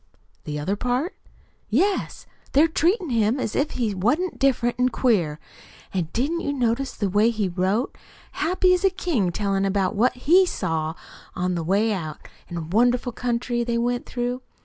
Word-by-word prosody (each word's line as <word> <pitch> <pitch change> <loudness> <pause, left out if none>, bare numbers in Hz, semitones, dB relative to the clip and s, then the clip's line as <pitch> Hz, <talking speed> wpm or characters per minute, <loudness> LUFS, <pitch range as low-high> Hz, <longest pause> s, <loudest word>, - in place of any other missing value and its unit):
"The 150 0 -4
other 185 +7 -1
part!" 250 - -1 0.5
"Yes. 375 - 0 0.3
They're 295 +4 +6
treatin' 340 - +1
him 230 +2 +2
as 225 - -2
if 290 +2 0
he 225 -5 0
wa'n't 290 - 0
different 250 -3 +2
an' 250 0 +3
queer. 185 - +1 0.5
An' 180 -4 -1
didn't 295 +8 0
you 285 - -1
notice 255 0 0
the 205 - -1
way 205 +4 +3
he 215 -4 -1
wrote? 190 +7 -1 0.4
Happy 365 +2 +2
as 360 - 0
a 390 - +5
king 295 - -1
tellin' 195 +1 0
about 195 -1 +1
what 235 +5 +3
he 330 +9 +5
SAW 160 - -2 0.4
on 180 0 -1
the 170 -2 -2
way 205 +6 +2
out, 155 -6 -6 0.2
an' 175 - -6
the 170 - -3
wonderful 245 +8 +2
country 240 0 -1
they 235 0 -1
went 245 +1 -1
through. 245 +1 -3
235 Hz, 170 wpm, -24 LUFS, 195-270 Hz, 0.5 s, They're